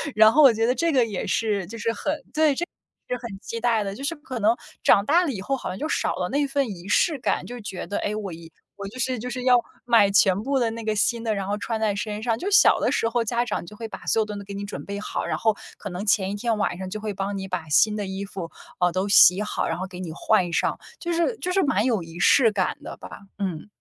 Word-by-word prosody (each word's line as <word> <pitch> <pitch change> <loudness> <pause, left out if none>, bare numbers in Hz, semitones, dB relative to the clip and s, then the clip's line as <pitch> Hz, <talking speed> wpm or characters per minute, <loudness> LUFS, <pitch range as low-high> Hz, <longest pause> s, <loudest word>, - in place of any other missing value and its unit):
然 220 +1 +7
后 310 - +6
我 265 -5 +8
觉 225 +1 +1
得 250 - +3
这 335 +6 +1
个 255 -5 +3
也 205 -5 -4
是 205 -2 0
就 230 - -8
是 230 +1 -1
很 295 +5 -3
对， 310 -2 +3
这 345 - -2 0.4
是 250 - -2
很 215 -5 -7
期 230 - -5
待 230 -2 +2
的。 195 -1 -4
就 275 - -8
是 330 +4 -1
可 265 -5 -7
能 220 +3 +3 0.3
长 200 - +5
大 340 +7 +4
了 290 - -1
以 195 - -5
后， 270 +7 -1
好 - - -5
像 185 - -5
就 305 - -3
少 - - 0
了 180 -1 -2
那 285 +1 +1
份 275 -2 0
仪 185 -1 -8
式 300 +8 +2
感。 - - -1
就 245 0 -7
觉 200 -3 -6
得， 205 - -3
诶， 210 +1 -2
我 200 -4 -4
衣 165 0 -11 0.3
我 200 -1 -6
就 215 - -10
是 255 -1 -1
就 250 +3 -5
是 250 +1 -4
要 250 -1 +6 0.3
买 230 -5 +5
全 195 -1 +4
部 275 +4 0
的 235 -3 +1
那 230 0 -6
个 215 -1 0
新 235 +2 +1
的， 220 -2 0
然 195 -1 -3
后 205 +1 -1
穿 225 +1 -3
在 210 -2 +1
身 210 +1 -4
上， 230 -2 0
就 395 - -2
小 410 - +6
的 - - +1
时 230 - +1
候 235 0 0
家 235 +2 0
长 245 - -3
就 210 - -11
会 225 +1 -6
把 - - -9
所 225 - +2
有 - - 0
东 210 -1 -6
西 200 - -7
给 200 - -8
你 200 +1 -5
准 200 - -7
备 200 0 -5
好， - - -3
然 - - -1
后 220 -2 +2 0.2
可 205 - -7
能 180 +3 -5
前 195 -2 +2
1 - - -3
天 225 +1 -1
晚 200 -4 -1
上 185 0 -6
就 215 +2 -5
会 215 -1 -3
帮 195 +1 -3
你 190 - -4
把 180 -4 -4
新 210 +8 +3
的 205 - -2
衣 190 +1 -4
服， 190 -4 -6 0.3
呃， 180 - +4
都 190 +3 -1
洗 195 0 +7
好， 210 - -2
然 165 - -2
后 185 - -3
给 180 -1 -10
你 180 -3 -5
换 180 -2 +1
上。 - - 0 0.2
就 345 - -3
是 340 +8 +1
就 365 - -2
是 390 - +3
蛮 215 -8 +2
有 225 -7 +1
仪 165 +1 -10
式 230 +3 +5
感 190 -3 0
的 - - -8
吧。 - - -10 0.3
嗯。 185 -5 -3
215 Hz, 310 characters per minute, -24 LUFS, 195-245 Hz, 0.4 s, 我